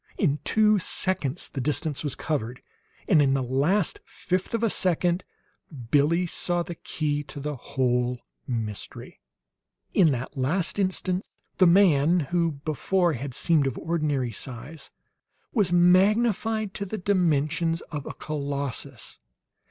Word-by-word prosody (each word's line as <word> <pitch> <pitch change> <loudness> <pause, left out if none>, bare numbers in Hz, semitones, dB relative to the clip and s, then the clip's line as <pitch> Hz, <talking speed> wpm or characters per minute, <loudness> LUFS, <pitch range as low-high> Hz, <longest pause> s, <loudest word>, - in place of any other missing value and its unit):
In 150 -6 +1
two 215 -1 +3
seconds 175 -6 -1
the 135 - -5
distance 150 +1 -1
was 145 - -2
covered, 125 -5 -3 0.4
and 160 -6 +5
in 135 -1 +3
the 135 - 0
last 145 +10 +1
fifth 185 +5 -3
of 230 - -2
a 230 - +3
second 175 0 +1 0.7
Billie 160 +5 +3
saw 175 0 0
the 175 - -6
key 150 -2 -2
to 145 +1 -9
the 150 +1 -3
whole 125 -1 0 0.3
mystery. 110 -5 -5 0.7
In 170 -6 +5
that 125 -1 -4
last 160 +9 0
instant 185 -1 -1 0.3
the 185 - +7
man 170 -3 +5
who 170 -2 +1
before 175 +3 +1
had 130 0 -5
seemed 155 -5 +2
of 135 - -3
ordinary 150 -7 -1
size, 135 +7 -8 0.6
was 205 -7 +2
magnified 210 +4 +3
to 200 - -4
the 215 - -4
dimensions 165 -3 +1
of 150 -3 -5
a - - -5
colossus. 140 -4 -3
160 Hz, 135 wpm, -26 LUFS, 140-185 Hz, 0.7 s, the